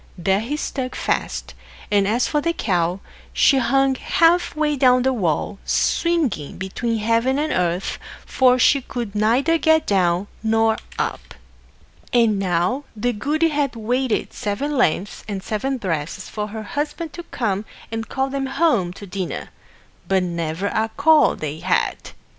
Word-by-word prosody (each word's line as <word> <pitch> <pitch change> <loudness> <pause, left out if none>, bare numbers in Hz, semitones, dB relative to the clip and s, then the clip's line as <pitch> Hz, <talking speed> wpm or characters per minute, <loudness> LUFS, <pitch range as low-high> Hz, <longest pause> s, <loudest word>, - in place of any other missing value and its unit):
There 190 +3 +1
he 250 +8 -3
stuck 260 -4 -4
fast; - - -2 0.4
and 200 -1 +3
as 235 +4 +2
for 295 - 0
the 335 +2 0
cow, 180 - 0 0.3
she 275 - +4
hung 270 +1 +3
half 335 +5 +2
way 305 -1 +1
down 255 -2 +4
the 265 0 +2
wall, 195 - -1
swinging 300 - 0
between 225 +5 -2
heaven 230 +5 +1
and 305 +1 0
earth, 180 +1 -1 0.3
for 255 -1 +4
she 275 +2 +4
could 240 -5 -5
neither 245 +10 +2
get 315 0 +3
down 180 -1 +2 0.2
nor 225 0 +2 0.2
up. - - -3 0.8
And 225 -4 +3
now 185 +8 0
the 245 +3 0
goody 305 +9 +1
had 285 -4 -1
waited 245 +2 -1
seven 275 +9 -2
lengths 205 - 0
and 195 -3 -4
seven 260 +7 -2
breadths 165 -8 -3
for 210 -1 -4
her 215 +1 -6
Husband 300 +6 -4
to 345 - -6
come 215 - -2 0.3
and 225 0 -4
call 265 0 -1
them 270 -1 -2
home 265 - +1
to 200 - -10
dinner; 190 -1 -5 0.6
but 190 -1 +2
never 170 +1 -3
a 220 0 0
call 310 +1 +5
they 155 0 -5
had. - - 0
230 Hz, 155 wpm, -21 LUFS, 195-275 Hz, 0.8 s, call